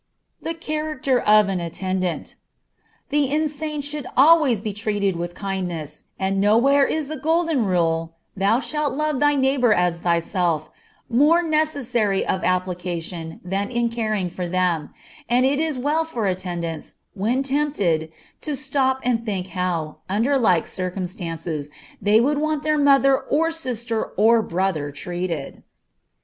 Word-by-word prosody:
The 330 - -4
Character 305 -5 -1
of 210 -2 +5
an 190 -2 -1
Attendant. 185 +1 -3 0.8
The 285 -2 +2
insane 300 0 -1
should 290 -2 -3
always 290 -5 +6
be 210 0 -4
treated 205 -2 -1
with 175 +1 -4
kindness, 180 -6 -5
and 195 0 0
nowhere 255 +7 +4
is 310 -2 -2
the 310 +1 -5
golden 320 -3 +1
rule 165 -3 0 0.2
"thou 200 +4 +2
shalt 300 +1 -1
love 305 -2 0
thy 290 0 +3
neighbor 265 -3 +2
as 180 -3 +2
thyself" 170 -2 0 0.4
more 295 +8 +4
necessary 280 - 0
of 190 - -1
application 180 -2 -3
than 195 +2 -2
in 240 -1 0
caring 215 -6 -2
for 180 0 -4
them; 175 -4 0 0.4
and 250 +2 +3
it 280 +2 +2
is 315 -3 -1
well 295 +5 +1
for 245 -9 -3
attendants, 175 -4 -4 0.2
when 230 +7 0
tempted, 260 - 0 0.3
to 300 - -3
stop 265 -1 0
and 240 -2 +1
think 195 -4 -3
how, 170 -4 -2
under 230 +9 +1
like 180 -9 +3
circumstances, 175 -5 -4 0.3
they 205 +2 +4
would 285 +5 +2
want 310 -1 -1
their 305 0 +1
mother 275 -1 +5
or 330 +3 0
sister 240 -7 -2
or 225 +3 +5
brother 175 -6 -1
treated. 170 0 -5
215 Hz, 140 wpm, -22 LUFS, 180-280 Hz, 0.8 s, always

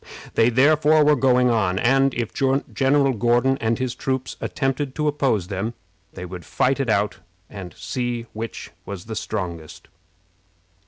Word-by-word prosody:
They 115 +1 +4
therefore 150 +4 +4
were 150 0 +5
going 125 -2 +3
on, 100 -5 +1
and, 135 +4 +3
if 115 -2 -3
General 135 0 +1
Gordon 120 +4 +2
and 115 0 +1
his 130 -2 -2
troops 130 -1 -3
attempted 135 0 -2
to 150 -1 0
oppose 135 -10 +1
them, 105 +4 -3 0.4
they 90 - -7
would 90 -1 -8
fight 135 +2 0
it 135 -3 -1
out 105 -1 +1 0.3
and 95 -4 -8
see 120 -2 -3
which 115 +1 -6
was 100 -3 -7
the 110 0 -6
strongest. 85 -8 -5
120 Hz, 150 wpm, -22 LUFS, 110-135 Hz, 0.4 s, were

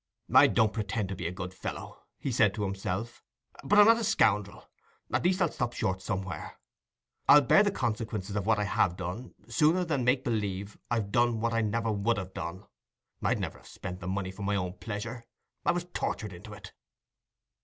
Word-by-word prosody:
"I - - +9
don't 110 -1 +2
pretend 105 -2 -2
to 95 - -3
be 90 -2 -3
a - - -3
good 90 0 -6
fellow," - - -7 0.2
he 135 - -3
said 110 -4 +3
to 105 - -2
himself; 100 +4 -3 0.4
"but 205 - +3
I'm 210 - +9
not 230 +1 +6
a - - -2
scoundrel—at 105 - -1
least, 180 +1 +2
I'll 165 - +1
stop 120 -1 -2
short 95 0 -1
somewhere. 95 -1 -4 0.7
I'll 150 - +10
bear 165 - +6
the 205 - +3
consequences 110 - -3
of 105 -1 -2
what 110 - +4
I 105 - +1
have 90 -3 +1
done 95 +7 -6
sooner 155 +9 +3
than 145 -6 0
make 125 +2 +2
believe 100 -5 -2
I've 110 -4 -1
done 120 0 +2
what 115 +1 0
I 115 - +2
never 115 +1 0
would 105 +2 +1
have 95 -1 -5
done. 95 +4 -6 0.6
I'd - - +1
never - - -4
have - - -18
spent 90 -1 -7
the 90 - -7
money 95 0 -2
for 95 - -11
my 100 +1 0
own 90 -2 -2
pleasure—I 115 +2 -5
was 175 0 -2
tortured 105 -3 -3
into 100 +5 -10
it." 100 -2 -11
105 Hz, 195 wpm, -29 LUFS, 95-120 Hz, 0.7 s, I'll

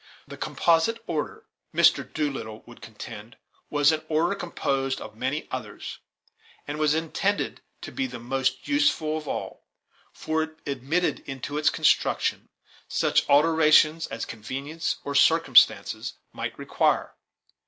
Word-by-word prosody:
The - - -9
composite 170 +7 +2
order, 155 -5 -4 0.3
Mr. - - +4
Doolittle 135 -8 -3
would 120 - -15
contend, 110 0 -10 0.3
was 145 +1 +4
an 155 0 -1
order 165 +4 +2
composed 135 -8 -2
of 110 0 -9
many 130 +6 -2
others, 115 -5 -6 0.7
and 150 +1 -4
was 155 0 +3
intended 165 +5 -1 0.2
to - - -7
be 270 -1 -2
the - - -7
most 130 +2 -2
useful 285 - +2
of 155 -1 -5
all, - - -5 0.4
for 160 0 -2
it 160 0 -5
admitted 140 +6 -1
into 135 +1 -5
its 150 - +4
construction - - +1 0.4
such - - +1
alterations 155 +1 +5
as 115 - -5
convenience 135 +9 -4
or 140 - -4
circumstances 145 -2 +4 0.2
might - - -5
require. - - 0
150 Hz, 130 wpm, -26 LUFS, 130-160 Hz, 0.7 s, alterations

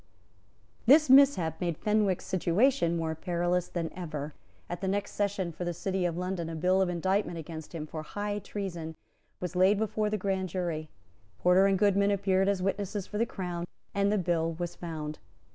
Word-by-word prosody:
This 290 +1 +7
mishap 265 - +5
made 170 -3 -1
Fenwick's 210 -3 +1
situation 185 +1 +2
more 160 -1 -1
perilous 175 +1 -1
than 165 -2 -4
ever. 155 -4 -5 0.3
At 175 - -5
the 190 - -1
next 200 +1 -1
sessions 200 -4 -1
for 170 - -5
the 175 -1 -2
City 190 +1 -1
of 170 -1 -1
London 180 -2 -3
a 165 - -5
bill 185 +4 +2
of 190 - +2
indictment 185 +1 0
against 160 0 -8
him, 155 -2 -4
for 155 0 -6
high 205 +5 -3
treason, 175 -6 -5 0.4
was 180 0 -4
laid 190 +3 +5
before 215 0 0
the 215 - 0
grand 190 -1 -1
jury. 165 -3 -3 0.5
Porter 180 - +5
and 195 -1 +3
Goodman 200 0 +3
appeared 195 -1 +2
as 195 -2 0
witnesses 195 0 -2
for 210 - -5
the 230 - +2
Crown; 175 -3 -4 0.3
and 200 0 +2
the 210 - +2
bill 165 -3 0
was 175 +1 -4
found. 155 -3 -6
185 Hz, 180 wpm, -29 LUFS, 170-200 Hz, 0.5 s, This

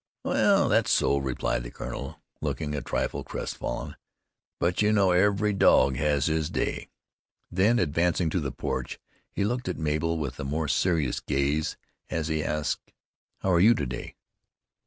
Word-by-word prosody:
"Well, - - +3
that's - - +2
so," 70 - +3
replied 65 -2 -1
the - - -7
colonel, 65 +3 -7 0.2
looking 75 -2 -2
a 75 - -2
trifle - - -2
crest - - -5
fallen; - - -4 0.6
"but 85 +3 +1
you 105 0 +4
know 100 -3 +4
every 100 +3 +3
dog 70 -8 +4
has 70 -1 +1
his 80 -1 0
day." - - -2 0.6
Then 100 +7 +3
advancing 85 -2 +1
to 90 - +1
the 70 -4 -3
porch, - - -4 0.3
he - - -2
looked 120 +1 -1
at 90 - -3
Mabel 80 +1 0
with 75 -5 -4
a - - -3
more 75 +3 -2
serious 80 -1 +1
gaze 70 +3 -1 0.3
as 80 -1 -2
he 80 -1 0
asked, 75 -2 -2 0.5
"How 95 - +1
are 85 - +4
you 110 +6 +6
to 70 - -2
day?" 60 0 -6
80 Hz, 165 wpm, -27 LUFS, 70-90 Hz, 0.6 s, you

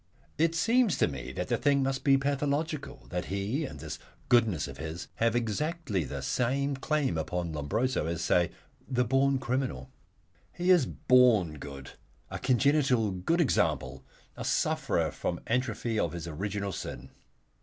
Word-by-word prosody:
It 165 +1 +3
seems 230 +3 +3
to - - +3
me 65 -4 -6
that - - -4
the - - +2
thing 140 -1 +2
must 135 0 -1
be 135 -2 +5
pathological, 145 +2 -2
that 90 0 -2
he 100 - -2
and - - -8
this - - -6 0.3
goodness 110 -10 +3
of - - -10
his 80 +2 -5
have 115 0 +2
exactly 120 - -1
the 70 0 -5
same 135 - 0
claim 135 - 0
upon 85 +1 -3
Lombroso, 75 - -1
let 85 +1 -1
us 85 - -4
say, 90 +1 +3
as - - -9 0.4
the 125 -2 +2
born 135 +3 +3
criminal. 130 +1 -2 0.6
He 180 +1 +2
is 170 -9 +5
born 110 - +3
good, 70 -2 -8 0.4
a - - -4
congenital 130 -3 +3
good 95 - 0
example, 65 - +1 0.3
a - - -6
sufferer - - +1
from 85 - -3
atrophy 115 -2 -1
of 85 - 0
his 85 -1 -5
original 100 +4 -3
sin. 65 -6 -7
120 Hz, 160 wpm, -29 LUFS, 85-140 Hz, 0.6 s, be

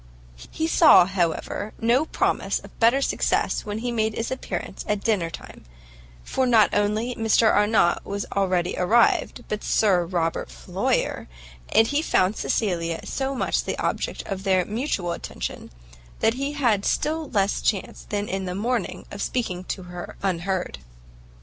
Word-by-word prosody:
He 320 - -2
saw, 320 - +7
however, 185 +3 -2
no 240 +6 +3
promise - - 0
of - - -13
better 240 +4 +4
success - - 0
when 205 0 -3
he 240 +2 -3
made 220 -2 0
his 230 - -3
appearance 260 - -5
at 210 -1 -1
dinner 195 -7 +1
time, - - -11 0.6
for 260 - 0
not 225 -4 +5
only 210 +4 +1
Mr 225 -1 +3
Arnott 205 -4 +3
was 200 0 -4
already 185 -3 +1
arrived, 225 +6 +2
but 210 - -4
Sir 190 -5 +3
Robert 165 - -1
Floyer, - - -2 0.4
and 225 - +5
he 285 +6 0
found 195 - +2
Cecilia 170 -8 -1
so 270 0 -2
much - - 0
the - - -3
object - - -2
of 195 -1 -5
their 185 -2 +2
mutual 210 - -2
attention, - - -6 0.5
that 225 - +3
he 275 +3 -3
had 235 -9 +1
still 310 +5 -1
less 200 -2 +1
chance 200 -4 -2
than 205 0 -2
in 190 0 -3
the 180 0 -4
morning 235 +4 -2
of 200 - -6
speaking 185 -8 -2
to 190 - -4
her 175 0 -8
unheard. 185 - -2
205 Hz, 155 wpm, -24 LUFS, 185-235 Hz, 0.6 s, saw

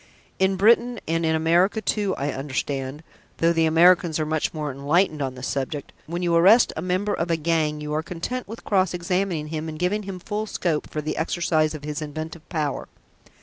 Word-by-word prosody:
"In 190 0 +3
Britain 235 +4 +3
and 165 +1 0
in 160 0 +2
America 170 +6 +3
too, 205 -2 0
I 140 +1 -2
understand 135 +1 -3 0.3
though 165 +1 +3
the 165 -1 +3
Americans 170 0 +4
are 155 - 0
much 155 0 -1
more 150 -2 -3
enlightened 150 +4 +1
on 130 -2 -2
this 130 +1 -6
subject 140 +2 -3
when 175 +2 -3
you 170 -1 +1
arrest 195 +8 +6
a - - -3
member 185 +4 0
of 170 -2 -2
a 165 - +2
gang 155 -2 0
you 150 0 -4
are 155 - 0
content 180 +10 -5
with 225 +3 -9
cross 185 -3 +1
examining 175 -3 -1
him 160 0 -4
and 155 - -7
giving 180 +5 0
him 195 -2 -6
full 210 +4 -4
scope 165 -7 -1
for 155 - -3
the 155 - -3
exercise 160 -2 +1
of 150 - -9
his 150 +1 -4
inventive 155 +2 -7
power. 155 -4 -2
165 Hz, 200 wpm, -24 LUFS, 150-185 Hz, 0.3 s, arrest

